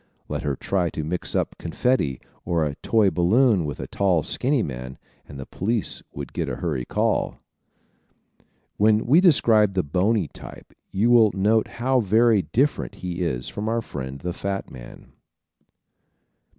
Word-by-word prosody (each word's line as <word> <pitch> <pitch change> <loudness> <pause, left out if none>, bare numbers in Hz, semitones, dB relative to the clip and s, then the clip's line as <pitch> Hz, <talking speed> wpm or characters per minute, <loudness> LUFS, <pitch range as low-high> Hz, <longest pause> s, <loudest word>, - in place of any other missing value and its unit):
Let - - -3
her 70 -2 -2
try 90 +4 -1
to 80 - -1
mix 85 +4 -3
up - - -1
confetti 85 - 0 0.2
or 85 -2 0
a 75 - -3
toy 110 -4 +2
balloon 95 +3 +3
with 75 - -5
a - - -4
tall 90 -6 +1
skinny 130 -2 +1
man 65 0 -6 0.3
and 70 - -10
the 65 - -6
police 110 +2 -2
would 70 -3 -8
get - - -2
a - - -3
hurry 70 -8 -3
call! - - -1 1.4
When 110 +1 +3
we 150 +9 +5
describe 110 - +4
the 95 - +1
bony 95 +5 +1
type - - -13 0.2
you 110 +5 +1
will 115 -3 +6
note 105 +3 +2
how 130 +2 +2
very 110 0 +3
different 135 +9 -1
he 90 0 -4
is 65 -8 -2
from 105 +1 -4
our 115 0 -1
friend 65 -4 -6
the 90 0 -3
fat 95 +1 -4
man. - - -12
95 Hz, 160 wpm, -23 LUFS, 80-115 Hz, 1.4 s, will